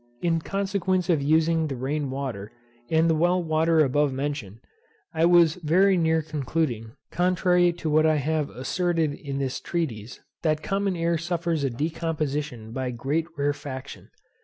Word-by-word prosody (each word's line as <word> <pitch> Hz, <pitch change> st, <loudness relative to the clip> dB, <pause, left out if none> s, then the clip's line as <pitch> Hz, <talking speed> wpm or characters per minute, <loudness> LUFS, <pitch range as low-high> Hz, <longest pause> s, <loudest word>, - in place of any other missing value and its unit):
In 165 Hz, -1 st, +2 dB
consequence 190 Hz, -2 st, 0 dB
of 155 Hz, -4 st, +2 dB
using 160 Hz, +2 st, +2 dB
the 135 Hz, -, -4 dB
rain 140 Hz, +3 st, -2 dB
water, 130 Hz, -7 st, -5 dB, 0.4 s
and 160 Hz, +1 st, +3 dB
the 165 Hz, -, +3 dB
well 175 Hz, +3 st, +2 dB
water 160 Hz, 0 st, +2 dB
above 145 Hz, +2 st, +1 dB
mentioned, 135 Hz, -6 st, -4 dB, 0.6 s
I 160 Hz, +1 st, +2 dB
was 170 Hz, -1 st, +5 dB
very 185 Hz, +5 st, +4 dB
near 160 Hz, -2 st, +2 dB
concluding, 140 Hz, -6 st, -2 dB, 0.2 s
contrary 180 Hz, 0 st, +3 dB
to 170 Hz, -1 st, -6 dB
what 155 Hz, +1 st, +4 dB
I 155 Hz, -, +3 dB
have 150 Hz, +1 st, 0 dB
asserted 165 Hz, +4 st, -1 dB
in 140 Hz, -1 st, -6 dB
this 135 Hz, -2 st, -2 dB
treatise, 120 Hz, -10 st, -4 dB, 0.2 s
that 155 Hz, -1 st, 0 dB
common 195 Hz, -1 st, 0 dB
air 170 Hz, -1 st, 0 dB
suffers 170 Hz, -2 st, -1 dB
a 135 Hz, -, +1 dB
decomposition 150 Hz, -4 st, -3 dB
by 130 Hz, +1 st, -3 dB
great 135 Hz, +7 st, -2 dB
rarefaction. 140 Hz, -2 st, -4 dB
155 Hz, 150 wpm, -25 LUFS, 140-170 Hz, 0.6 s, was